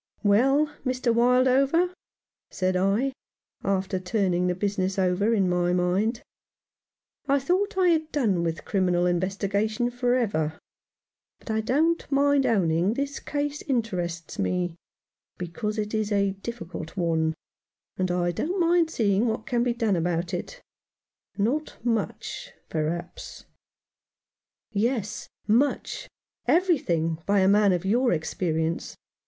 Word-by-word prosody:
"Well, 270 +9 +3
Mr. 255 -2 0
Wildover," 260 +8 +3 0.6
said 185 0 -1
I, 200 +9 +1 0.5
after 190 -1 0
turning 180 -2 0
the 180 - 0
business 195 0 -1
over 190 +3 +2
in 200 -5 +2
my 175 0 +1
mind, 190 +6 +1 0.5
" - - -67 0.2
I 280 0 +4
thought 375 +9 0
I 365 -1 +4
had 315 -2 +1
done 215 - +1
with 165 -1 -3
criminal 180 -3 +1
investigation 200 +6 0
for 245 0 +1
ever; 160 -10 0 0.8
but - - -7
I 220 0 +1
don't 305 +9 +1
mind 280 0 +3
owning 180 0 +2
this 280 +1 -3
case 290 0 -3
interests 180 - -3
me, 180 -2 0 0.6
because 210 +5 -4
it 210 0 -3
is 215 -1 -1
a 200 -1 +2
difficult 195 -5 -7
one, 160 -2 +1 0.6
and 185 -1 -1
I 175 0 +1
don't 345 - -2
mind 340 -1 +3
seeing 215 -5 +1
what 220 0 -2
can 240 -1 0
be 240 -1 +1
done 225 -5 +1
in 170 0 0
it 175 - -3 0.8
Not 255 +10 -1
much, 225 -3 -2 0.2
perhaps." 160 +2 -4 1.3
"Yes, 220 0 -1 0.2
much 240 +7 0 0.2
— - - -56
everything 170 - 0
— - - -38
by 200 -1 +3
a 190 - +4
man 205 0 +5
of 180 0 -1
your 240 +5 +2
experience. 160 0 -1
205 Hz, 130 wpm, -26 LUFS, 180-255 Hz, 1.3 s, man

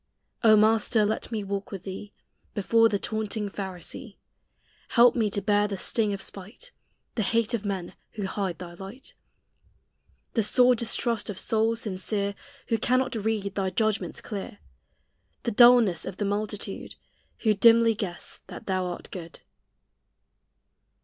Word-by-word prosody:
O 220 -1 +7
Master, 215 0 +4
let 215 +2 -2
me 215 -2 -2
walk 200 +3 -4
with 195 -3 -6
thee 195 +2 -7 0.4
Before 225 +3 +4
the 205 - 0
taunting 215 0 -2
Pharisee; 195 +4 -6 0.7
Help 240 0 +5
me 220 -4 +1
to 200 -1 -2
bear 205 0 +3
the 200 -2 -4
sting 215 +2 +1
of 200 - -4
spite, 210 - -9 0.4
The 225 - -1
hate 230 +2 +1
of 220 -3 -2
men 190 -3 -3 0.2
who 205 -3 -4
hide 190 -3 -3
thy 175 -1 -9
light, 195 +9 -9 1.2
The 225 - +2
sore 250 +4 +5
distrust 230 -1 +1
of 200 - -5
souls 225 +2 +1
sincere 200 0 -2 0.4
Who 225 -2 +1
cannot 255 +3 +1
read 215 -3 -2
thy 195 -2 -1
judgments 215 +1 -1
clear, 200 - -6 0.9
The 235 - -1
dulness 235 -6 +6
of 185 - -6
the 205 - -1
multitude 205 0 -4 0.5
Who 215 -2 +4
dimly 230 +2 +6
guess 190 -5 -6
that - - -10
thou 185 -1 -1
art 175 - -7
good. 170 -3 -8
210 Hz, 145 wpm, -26 LUFS, 195-225 Hz, 1.2 s, O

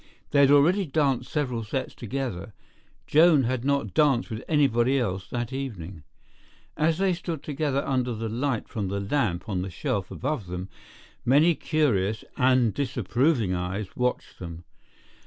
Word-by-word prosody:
They 140 - +3
had 140 -1 +6
already 165 +7 +4
danced 135 -4 0
several 125 -6 -1
sets 130 +5 -3
together; 115 -5 -5 0.5
Joan 155 -2 +5
had 125 0 -1
not 140 0 0
danced 140 -6 +2
with 110 - -5
anybody 135 -4 +3
else 95 -7 -2
that 120 +1 -3
evening. 100 - -6 0.7
As 160 +1 +1
they 190 0 +2
stood 170 -3 -5
together 140 -2 -1
under 125 -3 0
the 110 +1 -3
light 120 +2 -2
from 105 -4 -3
the 100 +1 -2
lamp 100 -4 -1
on 95 -4 -1
the 95 - -4
shelf 95 +2 -2
above 130 -6 -3
them, 90 +1 -5 0.5
many 150 +7 +5
curious 110 - 0
and 125 -4 +3
disapproving 125 - 0
eyes 90 +3 -4
watched 125 0 -2
them. 85 -1 -8
125 Hz, 150 wpm, -26 LUFS, 105-145 Hz, 0.7 s, had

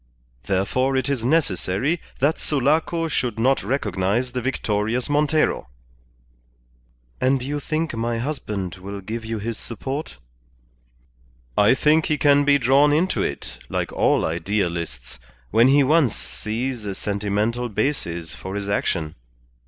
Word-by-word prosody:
Therefore 130 +8 +1
it 130 0 0
is 135 -5 -1
necessary 130 - +1 0.2
that 145 +5 +1
Sulaco 155 +4 +1
should 125 -7 -1
not 130 +4 +2
recognize 105 0 -1
the 125 - -2
victorious 115 0 -1
Montero." 150 - +1 1.5
"And 130 0 +2
you 145 +3 -2
think 155 +2 -2
my 115 +1 -1
husband 105 - -4
will 100 +2 -7
give 110 +4 -5
you 110 0 -3
his 110 +2 -4
support?" 135 - -5 1.4
"I 105 +5 +5
think 155 +3 +3
he 150 - +1
can 145 -1 +4
be 145 0 +5
drawn 140 +3 +4
into 165 +6 +1
it, 60 - -4
like - - -2
all - - +2
idealists, 85 - -2 0.3
when 115 +3 +5
he 140 +1 +5
once 145 -4 +3
sees 115 +2 -4
a 100 -2 -4
sentimental 105 +5 -1
basis 85 - -2
for 95 +6 -7
his 100 -1 -3
action. 85 -6 -1
120 Hz, 130 wpm, -23 LUFS, 100-140 Hz, 1.5 s, I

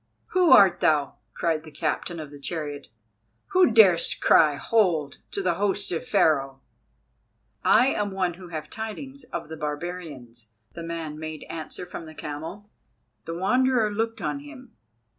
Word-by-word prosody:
"Who 365 -2 +3
art 195 -3 +7
thou?" 145 -3 +2 0.2
cried 160 -2 0
the 160 - -11
captain 155 +2 -3
of 150 -2 -8
the 145 - -11
chariot, 145 -1 -5 0.6
"who 370 -4 +5
darest 195 -7 +5
cry 150 -3 +5
'hold' 170 -6 +1
to 200 - -4
the 180 -2 +2
host 200 +2 -1
of 165 - -3
Pharaoh?" 135 -3 +2 1.0
"I 245 +5 +5
am 205 -5 -1
one 185 -2 -1
who 180 +1 -11
have 155 -3 -6
tidings 255 +5 -7
of - - -6
the 160 +1 -8
barbarians," 145 -7 -6 0.2
the 170 - -7
man 165 -2 -5
made 155 -1 -6
answer 160 +2 -7
from 175 -2 -8
the 155 - -12
camel. 160 +8 -7 0.6
The 165 - -5
Wanderer 245 +4 +2
looked 225 +2 -2
on 280 - -2
him. 280 -4 -12
170 Hz, 155 wpm, -25 LUFS, 155-210 Hz, 1.0 s, art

